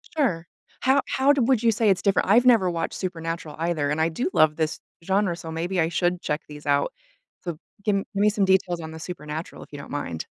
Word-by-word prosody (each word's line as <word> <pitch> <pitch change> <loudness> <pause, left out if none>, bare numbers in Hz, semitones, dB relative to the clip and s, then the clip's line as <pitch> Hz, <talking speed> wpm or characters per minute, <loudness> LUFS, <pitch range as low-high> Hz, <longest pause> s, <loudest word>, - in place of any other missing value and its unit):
Sure. 180 - 0 0.3
How 270 +2 +4
how'd 270 -2 +3
would 255 -4 +3
you 230 - +5
say 220 0 +2
it's 190 - +2
different? 195 -1 +1
I've 235 +4 +5
never 225 -7 +5
watched 165 -1 -2
Supernatural 165 -3 -4
either, 160 -3 0
and 150 +2 -1
I 160 - +3
do 245 - -2
love 155 -1 +4
this 160 -1 -1 0.2
genre, 190 -1 +1
so 165 -2 -8
maybe 175 +3 -2
I 160 - +2
should 175 +1 0
check 150 +1 -2
these 150 0 -11
out. 140 0 +1 0.5
So 170 -4 -4 0.3
gi 200 -2 +2
gimme 205 +2 +4
some 205 -1 +1
details 185 -2 +2
on 160 -1 -7
the 160 - -9
Supernatural, 160 -1 -6
if - - -18
you 145 - -8
don't - - -10
mind. 85 - -4
175 Hz, 220 wpm, -25 LUFS, 160-205 Hz, 0.5 s, you